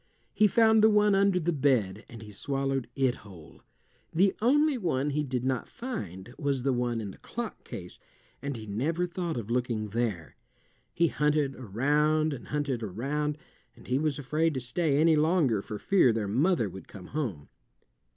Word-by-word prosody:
He 215 - +5
found 220 0 +4
the 220 - +8
one 210 -1 +4
under 195 -1 +3
the 170 0 0
bed 120 -9 +1
and 115 -1 -10
he 105 - -10
swallowed 135 +3 -2
it 130 -2 +1
whole. 90 -7 -14 0.5
The 190 +3 +3
only 295 +5 +4
one 150 - -1
he 150 +2 0
did 125 -3 -3
not 130 -3 -1
find 120 - -6
was 140 -4 -1
the 135 -1 +2
one 120 -1 -1
in 105 -3 -5
the - - -15
clock 235 -1 -6
case, 90 -1 -8 0.4
and 140 -3 -4
he 110 - -8
never 145 - -1
thought 175 -3 -3
of 115 -1 -5
looking 120 -3 -1
there. 105 -7 -3 0.5
He 170 -1 +2
hunted 150 -2 +1
around 150 +7 +1
and 130 - -8
hunted 145 -5 -2
around, 140 +9 -2 0.4
and - - -17
he 130 +2 0
was 150 -2 0
afraid 155 +3 0
to - - 0
stay 140 +4 0
any 160 +1 +5
longer 150 - +2
for 105 +1 -6
fear 180 - +4
their 110 -2 -1
mother 135 - +2
would 95 -2 -10
come 90 -3 -11
home. 105 - -3
135 Hz, 180 wpm, -28 LUFS, 115-165 Hz, 0.5 s, the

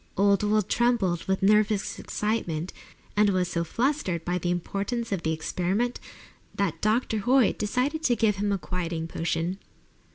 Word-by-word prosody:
Old 200 0 +4
Will 210 0 +2
trembled 205 -6 +1
with 190 0 -1
nervous 210 0 +2
excitement, 185 -6 -2 0.4
and 210 0 +4
was 185 -2 +1
so 170 -1 -1
"flustered" 230 - -1
by 180 +1 0
the 175 - -2
importance 200 +7 -2
of 195 -4 -1
the 160 - 0
experiment 185 +9 -1 0.6
that 195 -5 -1
Dr. 220 +1 +1
Hoyt 245 +2 +3
decided 255 +9 0
to 240 - +4
give 210 -2 +2
him 205 +1 0
a 200 - +1
quieting 170 -1 -3
potion. 165 +3 -2
200 Hz, 155 wpm, -26 LUFS, 175-220 Hz, 0.6 s, Old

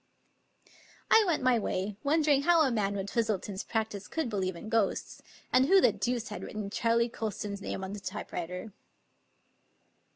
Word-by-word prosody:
I 445 - +8
went 315 -6 +1
my 250 -2 +4
way, 200 0 -2
wondering 295 -1 +3
how 335 +1 +5
a 270 - +2
man 200 -3 0
with 195 0 -4
Twistleton's 210 -4 -1
practice 220 -3 -3
could 320 -7 -2
believe 190 -3 -1
in 170 - -9
ghosts, 220 -3 -1 0.3
and 260 +1 +5
who 385 +3 +7
the - - +5
deuce 240 -2 -2
had 210 - -6
written 210 -2 -5
Charley 230 +1 +2
Colston's 210 -3 -4
name 195 - -4
on 190 +1 -5
the 205 - -5
typewriter. 180 0 -5
220 Hz, 160 wpm, -30 LUFS, 200-255 Hz, 0.3 s, I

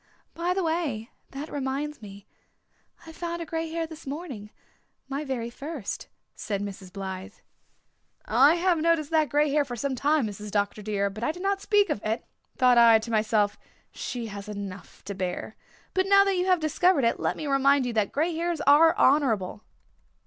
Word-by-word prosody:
"By 350 +2 -1
the 380 - 0
way, 320 -9 -2 0.2
that 280 +3 -6
reminds 285 +1 -3
me 200 -1 -11 0.8
I 325 - -10
found 340 +1 -4
a 335 - -4
grey 325 0 -3
hair 330 0 -2
this 320 -2 -11
morning 275 -8 -6 0.6
my 275 +2 -3
very 245 -4 -3
first," 280 -3 -6 0.3
said 200 -2 -3
Mrs. 195 -2 -7
Blythe. 190 +1 -6 0.9
"I 270 +8 +5
have 350 -1 +2
noticed 325 -2 +1
that 310 -3 +3
grey 295 +2 +2
hair 295 0 +3
for 250 -3 -6
some 275 +3 -2
time, 285 +1 +2
Mrs. 210 0 -6
Dr. 205 +1 -1
dear, 200 -1 -1
but 215 +3 -7
I 275 - +1
did 355 +3 -9
not 395 0 0
speak 410 -1 +3
of 205 - -3
it. 220 +2 -2 0.3
Thought 250 -1 +5
I 230 -1 +8
to 220 +1 -6
myself, 215 -2 +1 0.3
'She 245 -3 -5
has 205 -1 -7
enough 200 -2 -8
to 200 - -5
bear.' 185 +3 -4 0.4
But 375 0 +1
now 395 0 +7
that 395 -1 +1
you 360 +1 0
have 365 -2 +4
discovered 310 0 +2
it 230 - +1
let - - -1
me 310 - -5
remind 275 -1 +3
you 245 - -2
that 215 -3 +1
grey 325 +4 0
hairs 335 0 -2
are 320 +4 +6
honourable." 225 -9 +2
275 Hz, 185 wpm, -26 LUFS, 215-325 Hz, 0.9 s, I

